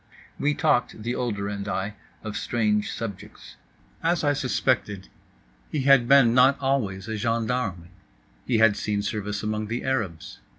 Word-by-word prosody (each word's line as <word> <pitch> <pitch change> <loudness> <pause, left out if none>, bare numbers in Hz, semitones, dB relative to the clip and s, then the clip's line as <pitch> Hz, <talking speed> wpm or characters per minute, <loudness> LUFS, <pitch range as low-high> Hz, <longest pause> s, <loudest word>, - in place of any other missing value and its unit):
We 145 +1 +1
talked, 115 -3 +1
the 120 +2 -2
older 105 -6 -2
and 100 0 -5
I, 100 +1 -2 0.3
of 110 -1 -5
strange 105 -3 0
subjects. 100 -5 -8 0.5
As 170 0 +1
I 145 -1 +3
suspected, 110 -6 -1 0.6
he 150 - -1
had 135 -3 +5
been 135 -3 +6
not 130 +2 +5
always 115 -8 -1
a 110 -1 -3
gendarme. 115 -6 -2 0.6
He 120 - +2
had 110 -2 +5
seen 105 -1 -2
service 105 0 -3
among 110 0 -2
the 120 +3 -3
Arabs. 105 -12 -3
110 Hz, 145 wpm, -25 LUFS, 105-130 Hz, 0.6 s, been